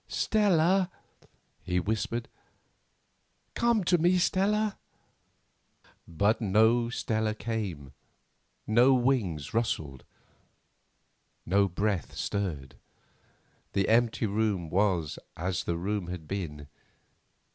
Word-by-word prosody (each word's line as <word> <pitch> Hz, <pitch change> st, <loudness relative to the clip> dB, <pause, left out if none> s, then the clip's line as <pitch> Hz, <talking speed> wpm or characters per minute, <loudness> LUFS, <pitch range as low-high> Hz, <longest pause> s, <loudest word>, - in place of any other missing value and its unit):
"Stella," 190 Hz, -3 st, +2 dB, 0.7 s
he 90 Hz, 0 st, -1 dB
whispered, 110 Hz, +4 st, -2 dB, 1.3 s
"come 235 Hz, -3 st, +2 dB
to 175 Hz, 0 st, +3 dB
me, 175 Hz, +3 st, +3 dB
Stella!" 205 Hz, +4 st, +1 dB, 1.3 s
But 100 Hz, +8 st, +1 dB
no 110 Hz, +3 st, +3 dB
Stella 110 Hz, -3 st, -1 dB
came; 100 Hz, -, -4 dB, 0.7 s
no 120 Hz, +5 st, +5 dB
wings 115 Hz, -, 0 dB
rustled, 80 Hz, -, -2 dB, 1.4 s
no 100 Hz, +2 st, +3 dB
breath 100 Hz, 0 st, -2 dB
stirred; 85 Hz, -10 st, -3 dB, 1.0 s
the 95 Hz, -, +1 dB
empty 115 Hz, 0 st, +2 dB
room 100 Hz, -5 st, -1 dB
was 90 Hz, -5 st, +1 dB, 0.2 s
as 90 Hz, 0 st, -2 dB
the 85 Hz, -, -1 dB
room 100 Hz, +1 st, -2 dB
had 90 Hz, -3 st, -7 dB
been. 75 Hz, -7 st, -5 dB
105 Hz, 90 wpm, -28 LUFS, 90-120 Hz, 1.4 s, no